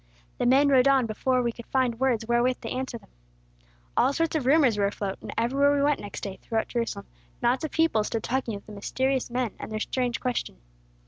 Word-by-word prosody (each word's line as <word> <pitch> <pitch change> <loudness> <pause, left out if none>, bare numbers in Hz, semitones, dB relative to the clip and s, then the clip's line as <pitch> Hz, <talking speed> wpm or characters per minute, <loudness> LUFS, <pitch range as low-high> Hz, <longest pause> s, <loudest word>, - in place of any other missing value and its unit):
The - - +2
men 275 +3 +5
rode 265 -1 +5
on 270 -3 +4
before 250 +3 0
we 235 - 0
could 235 0 -12
find 250 -3 0
words 245 -4 +1
wherewith 240 +2 +1
to - - -5
answer 255 -2 -3
them. 225 - -20 0.9
"All 275 - +3
sorts 330 +1 0
of 280 -5 -1
rumors 275 -5 +5
were 200 - +3
afloat, 200 -1 -4
and - - -7
everywhere 275 +5 +3
we 280 - +2
went 290 0 +2
next 205 - -7
day, 195 -2 -6
throughout 225 -1 -2
Jerusalem, 230 -4 -3 0.3
knots 245 +3 +1
of 315 - -2
people 320 -10 +2
stood 225 +1 -3
talking 245 -3 -1
of 200 - -10
the - - -12
mysterious 260 +6 -1
men, 245 -2 -1
and - - -7
their 215 - -2
strange 245 +1 -1
question. 245 - -3
245 Hz, 215 wpm, -26 LUFS, 225-265 Hz, 0.9 s, men